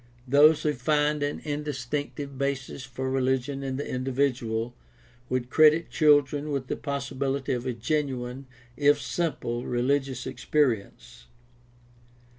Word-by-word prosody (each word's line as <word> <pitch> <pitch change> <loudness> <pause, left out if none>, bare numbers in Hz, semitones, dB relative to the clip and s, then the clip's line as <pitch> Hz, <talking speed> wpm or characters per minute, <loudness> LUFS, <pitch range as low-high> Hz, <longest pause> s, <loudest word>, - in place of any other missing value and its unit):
Those 145 +4 +6
who 150 - +2
find 150 +3 +1
an 145 0 -2
instinctive 145 -1 -4
basis 140 -1 -3
for 130 +1 -5
religion 130 +1 0
in 135 -1 -3
the 145 - -4
in 130 0 -3
dividual 125 -3 -1 0.6
would 125 -1 -2
credit 155 +1 +5
children 145 -1 +3
with 140 -3 -2
the - - -3
possibility 140 -1 -2
of 125 +1 -3
a 125 - -1
genuine, 130 0 -2 0.3
if 145 0 +4
simple, 135 -8 -2
religious 130 +1 0
experience. 120 -4 -1
135 Hz, 120 wpm, -27 LUFS, 125-145 Hz, 0.6 s, Those